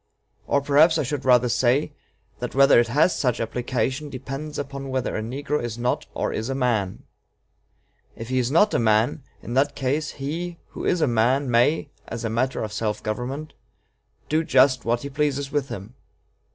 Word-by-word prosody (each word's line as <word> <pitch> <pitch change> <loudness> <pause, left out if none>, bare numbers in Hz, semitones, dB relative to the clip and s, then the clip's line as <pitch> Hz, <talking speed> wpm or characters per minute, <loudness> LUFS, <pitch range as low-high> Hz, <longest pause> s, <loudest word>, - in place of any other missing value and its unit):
Or 140 - +2
perhaps 150 +4 +4
I 155 - +1
should 140 +1 -4
rather 125 -1 +5
say, 125 +4 +2 0.5
that - - -5
whether 135 -2 +6
it 120 - +2
has 150 +9 +3
such 125 -4 0
application 125 +5 -2
depends 135 +3 -6
upon 140 -1 -5
whether 130 -1 -2
a - - -1
negro 140 +6 -2
is 120 -1 -4
not 125 +1 -1
or - - -1
is 110 +4 -3
a 135 - -1
man. 115 -8 -1 1.1
If 115 +1 -8
he 130 0 +1
is 120 -1 0
not 205 +9 +4
a - - +2
man, 110 +4 +2 0.2
in 120 - -6
that 140 +2 +2
case, 140 +3 -1
he 165 +5 -4
who - - -7
is 175 - +1
a 155 - +3
man 125 +3 +2
may, 120 +7 +2 0.2
as 115 0 -5
a 110 - -2
matter 130 +3 0
of 105 -1 -5
self 110 -1 -2
government, 130 +8 -4 0.7
do 155 +2 +1
just 130 -4 +3
what 120 +2 0
he 140 - -5
pleases 140 -1 -1
with 145 -1 -1
him. 100 +4 -7
130 Hz, 185 wpm, -24 LUFS, 120-145 Hz, 1.1 s, whether